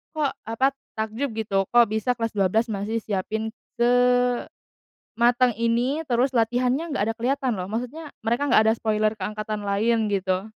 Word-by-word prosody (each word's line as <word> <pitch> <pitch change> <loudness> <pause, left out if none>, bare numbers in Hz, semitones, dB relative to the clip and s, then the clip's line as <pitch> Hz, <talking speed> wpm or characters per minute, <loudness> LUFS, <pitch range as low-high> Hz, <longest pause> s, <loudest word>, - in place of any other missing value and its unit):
kok, 300 -3 +1 0.2
apa, 260 +5 +2 0.2
takjub 220 +6 -2
gitu 200 -3 0
kok 240 0 +7
bisa 220 +3 +1
kelas 230 -1 -2
12 210 +3 +1
masih 215 +3 -2
siapin 215 +2 -2 0.3
sematang 245 0 +2 1.0
ini, 245 +7 0
terus 250 0 +2
latihannya 250 +7 +1
gak - - -1
ada - - 0
keliatan 255 -1 0
loh, 180 - -3
maksudnya 250 - -5
mereka 235 +5 0
gak - - +7
ada - - +4
spoiler 215 0 0
ke 190 - -3
angkatan 215 0 -4
lain 220 +3 +1
gitu 190 0 0
225 Hz, 155 wpm, -24 LUFS, 215-250 Hz, 1.0 s, kok